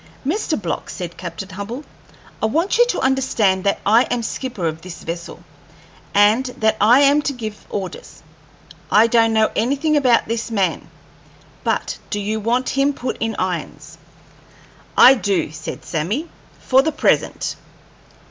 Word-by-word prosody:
"Mr. 320 - -1
Block," 175 -5 -4
said 175 -2 -6
Captain 175 +2 -7
Hubbell, 205 +8 -6 0.6
"I 220 - +2
want 335 - 0
you 485 - +6
to - - -1
understand 230 -8 +1
that 200 - +1
I 225 +5 +5
am 245 -1 -2
skipper 230 -5 -4
of 160 0 -2
this 180 -1 -10
vessel, 170 +1 -7 0.7
and 210 +5 +4
that 220 0 +2
I 240 +6 +6
am 285 +1 +5
to 290 - -2
give 220 -4 -7
orders. 190 -3 -7 0.7
I 215 +2 +6
don't 230 -1 +3
know 220 -1 +2
anything 280 +7 +1
about 255 -5 +3
this 230 +1 -3
man; 200 -5 -1 0.7
but - - -1
do 205 - -2
you 215 +2 -2
want 240 +4 0
him 275 +1 +1
put 250 0 -4
in 225 -1 -2
irons?" - - -4 1.0
"I 260 - +9
do," 200 - -1
said 155 0 -8
Sammy, 200 - -2 0.3
"for 265 +1 +3
the 315 +3 -1
present." 305 - 0
225 Hz, 150 wpm, -20 LUFS, 200-265 Hz, 1.0 s, I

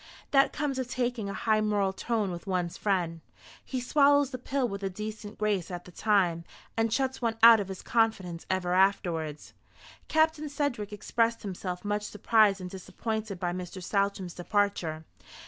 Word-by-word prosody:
That 275 -1 +5
comes 275 -3 -2
of 255 - -2
taking 245 -5 -2
a - - -4
high 215 -1 +2
moral 205 -2 +1
tone 215 -2 -1
with 175 +2 -7
one's 180 -3 -1
friend. 175 -5 -1 0.4
He 260 - -3
swallows 285 +1 +4
the 255 - -5
pill 260 +1 -1
with 200 -2 -5
a 195 - -1
decent 210 +2 -7
grace 205 -5 0
at 175 -1 -6
the 180 - -12
time, 180 -5 +2 0.3
and 225 0 +1
shuts 265 +2 0
one 230 -2 0
out 230 -1 +10
of 200 - -3
his 190 -1 -7
confidence 205 -7 0
ever 180 -1 0
afterwards." 170 -5 +1 0.5
Captain 315 -1 +2
Sedgewick 275 -8 -2
expressed 230 +2 0
himself 185 -1 -5
much 205 0 0
surprised 210 -1 +3
and 180 -1 -7
disappointed 215 +1 -4
by 175 -1 -1
Mr. 180 +1 -6
Saltram's 195 -1 -1
departure. 175 -4 -1
205 Hz, 165 wpm, -29 LUFS, 185-230 Hz, 0.5 s, out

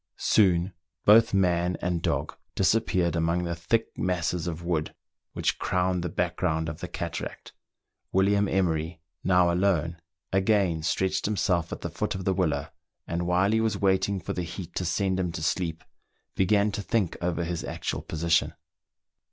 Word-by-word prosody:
Soon 90 -3 +3 0.3
both 115 +2 +7
man 90 -2 +2
and 90 -1 -1
dog - - -1 0.2
dis 95 - +3
appeared 95 -6 +1
among 85 +1 +1
the 85 -1 -2
thick 110 +7 0
masses 90 -2 -1
of 85 0 -4
wood 85 -3 -2 0.4
which - - -1
crowned 90 0 0
the 90 - -2
background 85 -2 -1
of 80 0 -5
the 90 - -5
cataract. 85 -2 -6 0.6
WiUiam 100 +1 +3
Emery, 80 -3 0 0.2
now 90 -2 +4
alone, 85 -3 +1 0.3
again 95 -4 +2
stretched 95 +4 0
himself 90 -5 0
at - - -5
the - - -4
foot - - -2
of 95 -1 -5
the 95 - +2
willow, 80 -7 0 0.4
and 85 +1 -2
while 90 +3 +3
he 110 0 +2
was 110 -3 0
waiting 95 0 +1
for 85 - -4
the 90 - -2
heat 85 +1 -7
to 90 - -2
send 95 +2 0
him 90 -2 -1
to 80 - -5
sleep, 80 -1 -1 0.5
began 100 +2 +2
to 100 - -3
think 105 -4 0
over 85 -1 -1
his 85 0 -3
actual - - -3
position. 80 +1 0
90 Hz, 165 wpm, -27 LUFS, 85-95 Hz, 0.6 s, both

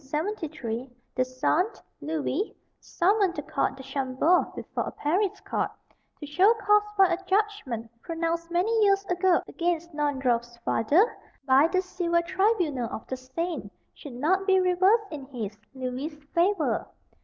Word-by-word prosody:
In 300 +3 -2
1873, 270 - -5 0.2
the 255 - +2
son, 255 +8 +1 0.3
Louis, 315 +5 -2 0.2
summoned 390 0 +1
the 295 - -4
Count 270 -1 -1
de 265 - -9
Chambord 270 +5 +1
before - - -4
a - - -4
Paris 365 +7 0
court, - - -1 0.5
to 295 - -6
show 365 +9 +4
cause 420 -1 +4
why 385 -3 +5
a 360 +3 -3
judgment 385 - -1
pronounced 335 0 -2
many 355 +6 +1
years 395 -1 +3
ago 360 -1 +2
against 340 -1 -2
Naundorff's 260 -5 0
father, 300 - +4 0.4
by 270 +3 +5
the 370 +2 0
Civil 340 -2 0
Tribunal 350 - +1
of - - -6
the 260 - -4
Seine, 290 +7 -4 0.2
should 285 -5 -10
not 375 +9 +1
be 380 -1 +5
reversed 375 +3 +3
in 290 -4 -6
his, 225 -6 -5 0.2
Louis's, 260 +4 -4 0.2
favour. 350 0 +1
335 Hz, 145 wpm, -27 LUFS, 270-375 Hz, 0.5 s, why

